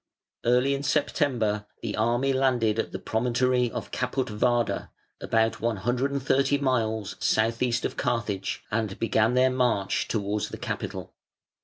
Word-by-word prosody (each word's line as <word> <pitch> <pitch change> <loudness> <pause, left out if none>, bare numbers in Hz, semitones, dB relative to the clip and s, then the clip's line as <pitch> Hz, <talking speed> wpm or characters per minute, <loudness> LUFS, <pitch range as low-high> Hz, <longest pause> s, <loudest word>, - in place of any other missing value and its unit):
Early 125 +3 +3
in 140 - -2
September 125 -8 0 0.2
the 110 -3 -2
army 120 +5 +1
landed 125 -5 +2
at - - -2
the - - -4
promontory 125 +2 +1
of - - -6
Caput 125 0 -1
vada, 120 +2 0 0.3
about 115 0 +1
one 115 -1 0
hundred 125 +7 0
and 140 -1 -2
thirty 140 +1 +2
miles 110 -7 0
south 115 +1 +1
east 120 -1 +1
of - - -3
Carthage, 105 -5 -2
and 110 -2 -1
began 115 +1 +2
their 130 +1 +4
march 125 -6 +1
towards 105 -1 -1
the - - -7
capital. - - -5
120 Hz, 150 wpm, -26 LUFS, 110-130 Hz, 0.3 s, their